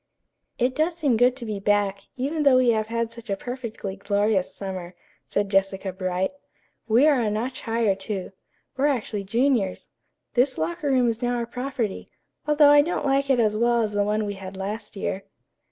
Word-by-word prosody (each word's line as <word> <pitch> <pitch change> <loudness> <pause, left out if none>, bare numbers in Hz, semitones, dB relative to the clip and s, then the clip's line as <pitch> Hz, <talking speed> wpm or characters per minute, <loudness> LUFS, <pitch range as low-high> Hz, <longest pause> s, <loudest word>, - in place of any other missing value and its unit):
"It 250 +1 +1
does 320 +3 +1
seem 285 -8 +2
good 245 +2 +4
to 250 -3 -6
be 210 -2 -3
back, 200 -1 0
even 290 +5 -1
though 275 -3 +6
we 255 -1 +4
have 215 -1 0
had 230 0 -2
such 230 -1 -11
a 195 - 0
perfectly 230 -5 -6
glorious 200 -1 0
summer," 185 -2 -6 0.3
said 205 0 0
Jessica 195 -1 +1
Bright. 185 0 -1 0.6
"We 235 +5 +5
are 290 -5 +4
a 220 - +1
notch 225 +5 -3
higher, 225 -3 +1
too. 195 0 -5 0.4
We're 275 +2 +2
actually 215 -7 -2
juniors. 230 -2 0 0.4
This 255 +2 +2
locker 170 - -2
room 255 -2 +3
is 230 +1 -1
now 245 0 0
our 235 -1 -1
property, 245 -3 -4 0.4
although 295 -1 +6
I 290 0 +8
don't 315 0 -2
like 275 0 +1
it 260 -2 +4
as 215 -2 +2
well 235 +1 +2
as 215 - -2
the 205 0 +1
one 210 +1 0
we 205 - -3
had 190 -1 -9
last 205 +4 -5
year." 195 0 -3
225 Hz, 190 wpm, -24 LUFS, 200-255 Hz, 0.6 s, I